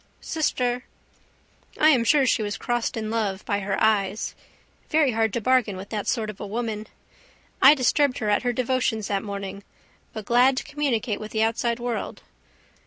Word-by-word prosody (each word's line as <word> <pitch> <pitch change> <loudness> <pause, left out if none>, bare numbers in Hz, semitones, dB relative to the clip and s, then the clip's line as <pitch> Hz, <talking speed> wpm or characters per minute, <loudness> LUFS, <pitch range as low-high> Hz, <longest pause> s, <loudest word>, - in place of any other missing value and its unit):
Sister? 250 -6 -1 0.9
I 310 - +6
am 260 -6 +4
sure 275 +4 +4
she 250 - +2
was 205 -1 -3
crossed 240 -1 -2
in 215 -1 -3
love 210 -4 -2
by 200 -2 0
her 195 0 -2
eyes. 210 -1 +1 0.6
Very 305 -4 +3
hard 225 -1 +1
to 235 - -1
bargain 240 -5 +2
with 195 +2 -9
that 210 -2 -4
sort 220 -3 -1
of 205 - -18
a 205 - -5
woman. 220 0 -4 0.7
I 280 +3 +9
disturbed 270 0 +2
her 215 - -3
at 205 - +2
her 245 - 0
devotions 245 -3 -1
that 200 -1 0
morning. 200 -1 -6 0.5
But 220 -2 -7
glad 250 +3 +4
to - - -1
communicate 255 -7 -1
with 215 - -7
the 220 0 +2
outside 235 +1 0
world. 240 -1 -4
225 Hz, 175 wpm, -24 LUFS, 210-250 Hz, 0.9 s, I